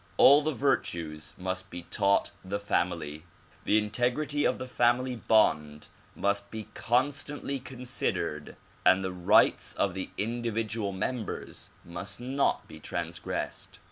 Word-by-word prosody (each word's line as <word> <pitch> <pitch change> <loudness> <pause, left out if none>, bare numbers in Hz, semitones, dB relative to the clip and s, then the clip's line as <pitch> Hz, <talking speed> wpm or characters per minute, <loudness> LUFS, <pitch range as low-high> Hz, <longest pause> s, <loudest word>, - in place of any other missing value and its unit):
All 145 +2 +8
the 155 +1 0
virtues 85 - -1
must 95 +1 -4
be 90 -1 -6
taught 100 +2 +2
the 95 +2 -2
family. 85 -6 -1 0.4
The 105 - +4
in 105 -1 0
tegrity 145 +6 +1
of - - -2
the - - -5
family 125 +1 +2
bond 75 -10 +2 0.3
must 100 0 0
be 110 -2 -7
constantly 140 +3 0
considered 125 -1 -3 0.3
and 95 +1 +5
the 95 -1 -2
rights 90 -1 +4
of 100 - +1
the 95 0 -4
individual 115 -2 -1
members 105 +3 -4 0.2
must 95 +5 -5
not 135 +3 0
be - - -11
transgressed. 85 0 -4
105 Hz, 130 wpm, -29 LUFS, 95-125 Hz, 0.4 s, All